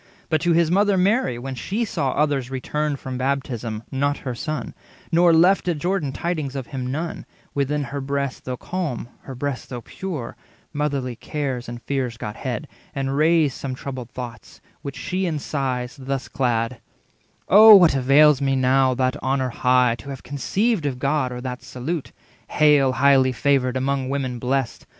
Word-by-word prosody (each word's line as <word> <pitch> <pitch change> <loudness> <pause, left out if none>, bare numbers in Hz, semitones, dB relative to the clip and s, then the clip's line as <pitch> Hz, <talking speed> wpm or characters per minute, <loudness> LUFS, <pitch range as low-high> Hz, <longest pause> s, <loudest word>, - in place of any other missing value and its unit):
But 155 -2 +1
to 175 -1 +2
his 165 -1 +3
mother 200 +1 +3
Mary, 190 - +2
when 135 +2 -5
she 205 - -2
saw 140 -10 -1
60 - - -3
Others 140 -4 -1
returned 145 +2 -2
from 130 -1 -5
baptism, 120 -5 -2
not 140 +2 0
her 125 - -2
Son, 155 0 -4 0.4
Nor 170 +1 +5
left 180 +4 +4
at 170 -3 +1
Jordan 175 -3 -1
tidings 150 -2 -3
of 135 -2 -4
him 130 -3 -4
none, 160 +4 -4 0.3
Within 145 +1 0
her 140 +2 -5
breast 140 -1 -3
though 125 -1 -4
calm, 160 -10 -4 0.2
her 135 - -7
breast 140 0 -4
though 125 -2 -6
pure, 150 - -6 0.4
Motherly 140 -4 -2
cares 130 -1 -4
and 120 0 -8
fears 130 -4 -2
got 105 -1 -6
head, 130 +4 -4 0.3
and 135 0 -1
raised 155 -1 +3
Some 130 -2 -5
troubled 130 -3 -7
thoughts, 125 -2 -9 0.2
which 140 - -6
she 185 0 -2
in 160 -3 -1
sighs 130 -3 -3
thus 135 0 -3
clad:— 120 -1 -1 0.7
"Oh, 215 +2 +10
what 175 -6 +7
avails 140 +2 +5
me 135 -1 +1
now 130 0 +3
that 130 +2 0
honour 130 0 0
high, 125 0 +3
To 135 - -10
have 135 -1 -7
conceived 190 - 0
of 130 -3 -3
God, 140 -1 0
or 125 0 -6
that 125 0 -5
salute, 145 +5 -5 0.4
'Hail, 145 -3 +4
highly 135 -1 +4
favoured, 130 0 +1
among 135 0 -1
women 130 -3 -2
blest! 130 0 -2
135 Hz, 175 wpm, -22 LUFS, 130-150 Hz, 0.7 s, Oh